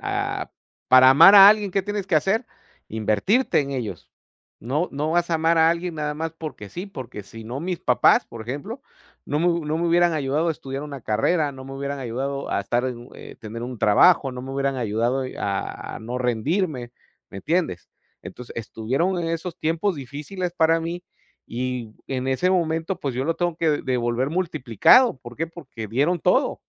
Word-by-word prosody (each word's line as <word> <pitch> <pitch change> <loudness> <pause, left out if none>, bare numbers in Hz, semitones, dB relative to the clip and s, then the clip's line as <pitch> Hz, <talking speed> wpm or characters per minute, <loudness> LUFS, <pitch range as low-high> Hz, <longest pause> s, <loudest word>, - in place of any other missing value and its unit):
ah, - - -3 0.4
para 130 0 +8
amar 165 +9 +8
a 195 0 +11
alguien 210 -2 +3
¿qué 195 - +1
tienes 205 0 -4
que 180 - 0
hacer? 195 - +1 0.4
Invertirte 110 - +1
en 140 -1 -4
ellos. 115 - -5 0.5
No 145 +9 -1
no 150 +3 -2
vas 175 0 +1
a - - +2
amar 165 +1 +2
a 160 0 +5
alguien 170 0 -3
nada 150 -1 -2
más 160 +1 -4
porque 155 -11 -8
sí, 175 - -6
porque 130 - -8
si 110 +3 -12
no 125 +5 -5
mis 180 0 -3
papás, 125 - +3
por 115 - -9
ejemplo, 145 - -6 0.4
no 145 - -2
me 175 - +2
hu 170 -2 0
no 155 +2 -1
me 170 - 0
hubieran 175 0 +4
ayudado 150 +2 0
a - - +2
estudiar 135 -2 -5
una 140 -2 -7
carrera, 145 +9 +1
no 130 -1 -11
me 135 - -9
hubieran 140 +1 -4
ayudado 135 +3 -4
a - - 0
estar 120 +5 -1
en 125 -2 -3
un 120 +2 -13
eh, - - -11
tener 115 0 -7
un 125 -1 -6
trabajo, 135 - +4
no 125 - -7
me 135 - -7
hubieran 135 0 -1
ayudado 120 +3 -1
y - - -9
a 100 -1 -4
no 120 +3 -4
rendirme, 125 - -1 0.4
¿me 95 - -8
entiendes? 160 - -1 0.3
Entonces, 125 -1 -10
estuvieron 130 - -2
en 165 - -2
esos 165 +1 -4
tiempos 165 +3 0
difíciles 150 +7 -5
para 165 -1 +3
mí 170 +2 -5 0.4
y 125 -2 -4
en 130 -1 -3
ese 135 +8 +1
momento, 165 0 -1
pues, 135 -3 -3
yo 130 +2 -2
lo 165 +1 0
tengo 175 -2 -1
que 165 -2 +1
devolver 125 0 -1
multiplicado, 160 - +3
¿por 120 -1 -12
qué? 165 +2 -2
Porque 135 -10 -9
dieron 145 - +1
todo. - - +2
140 Hz, 195 wpm, -23 LUFS, 125-170 Hz, 0.5 s, a